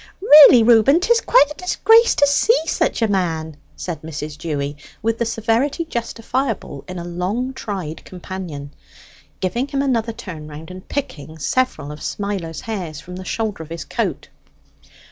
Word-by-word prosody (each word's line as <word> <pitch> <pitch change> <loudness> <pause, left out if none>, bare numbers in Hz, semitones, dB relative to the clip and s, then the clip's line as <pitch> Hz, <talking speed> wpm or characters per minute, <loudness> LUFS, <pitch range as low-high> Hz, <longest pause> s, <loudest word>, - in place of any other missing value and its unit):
"Really, 300 - +9
Reuben, 235 +7 +5
'tis 460 +5 +2
quite 300 - +4
a 300 - -9
disgrace 450 +5 +4
to 285 - +5
see 285 - +3
such 245 - 0
a - - +3
man," 165 -6 -1 0.2
said 175 -3 -5
Mrs. 155 -1 -6
Dewy, 145 -2 -3 0.3
with 225 0 0
the 235 - 0
severity 230 +9 0
justifiable 235 - -3
in 185 0 -7
a 170 - -5
long 185 +9 -3
tried 185 -10 -6
companion, 175 -6 -8 0.7
giving 235 +8 -1
him 275 -1 -1
another 235 -4 0
turn 185 -10 -9
round, 155 +3 -10
and 185 0 -11
picking 160 - -5
several 160 - -1
of 150 - -10
Smiler's 190 -6 -4
hairs 180 -9 -5
from 180 +2 -9
the 185 - -7
shoulder 215 -5 -3
of 160 - -9
his 165 -2 -6
coat. - - -3
200 Hz, 160 wpm, -20 LUFS, 160-255 Hz, 0.7 s, Really